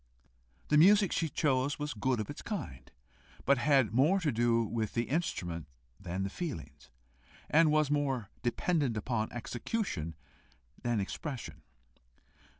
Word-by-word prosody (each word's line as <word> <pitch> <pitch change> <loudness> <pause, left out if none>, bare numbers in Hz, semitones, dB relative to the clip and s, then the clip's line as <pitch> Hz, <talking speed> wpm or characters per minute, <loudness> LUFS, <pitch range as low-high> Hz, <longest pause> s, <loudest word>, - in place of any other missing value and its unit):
The 150 - +5
music 200 +3 +6
she 165 - 0
chose 140 -2 +1
was 150 0 -3
good 120 +2 0
of 105 - -2
its 145 - -7
kind, 125 - -6 0.6
but 140 -1 +4
had 135 -5 +3
more 150 +11 +4
to 155 -4 +1
do 115 0 +2
with 110 -1 -3
the 115 - +2
instrument 90 - -2 0.3
than 95 0 -3
the 100 - -2
feelings, 135 - -6 0.6
and 160 +1 +6
was 155 -1 +2
more 135 -8 0
dependent 130 0 0
upon 110 0 -1
execution 120 - -3 0.7
than 120 -2 0
expression. 100 - -5
130 Hz, 135 wpm, -32 LUFS, 110-150 Hz, 0.7 s, music